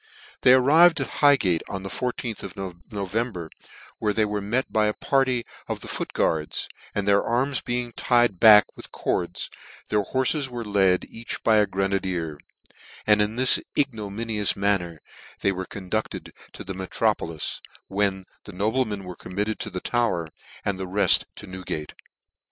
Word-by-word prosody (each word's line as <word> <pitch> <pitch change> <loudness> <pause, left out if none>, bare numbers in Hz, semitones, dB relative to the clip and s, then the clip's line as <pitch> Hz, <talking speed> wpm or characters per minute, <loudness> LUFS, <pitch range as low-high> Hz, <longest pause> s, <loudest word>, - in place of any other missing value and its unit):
They 125 - +7
arrived 160 +6 +6
at 135 - -5
Highgate 120 - +4
on 95 -1 -5
the 95 - -5
I4th 120 0 -4
of 100 +1 -8
No 95 +2 -6
vember, 100 -5 -3 0.5
where 105 -1 0
they 110 +1 +2
were 105 0 -2
met 115 +6 -1
by 105 -1 +3
a 105 - -1
party 130 -3 +1 0.2
of - - -4
the - - -9
foot - - -4
guards, 75 -1 -1 0.3
and 100 -1 -1
their 100 0 +4
arms 130 +2 0
being 120 -1 -3
tied 120 -7 +2
back 105 -2 +9
with - - -11
cords, 90 0 -3 0.4
their 105 - +2
hories 130 +6 0
were 120 -2 -6
led, 95 -3 +2
each 115 +1 -7
by 110 -1 +4
a 105 -1 +4
grenadier; 95 -5 -2 0.7
and 105 -1 +5
in 105 +2 0
this 130 +1 +6 0.2
ignominious 110 -5 0
manner 95 -5 -1 0.4
they 100 - +3
were 95 -1 -4
con 95 -2 -8
dueled 110 +3 -3 0.2
to - - -8
the 95 - -6
metropolis; 95 -4 -2 0.3
when 95 -1 0 0.2
the 105 - -10
noblemen 105 +1 -1
were 90 -1 -8
committed 105 +3 -3
to 105 - -4
the 90 -2 -5
Tower, 115 -10 0 0.4
and 100 -2 -1
the 95 - -4
reft 100 +3 +4
to - - -9
Newgate. 90 -5 -6
105 Hz, 165 wpm, -24 LUFS, 95-120 Hz, 0.7 s, back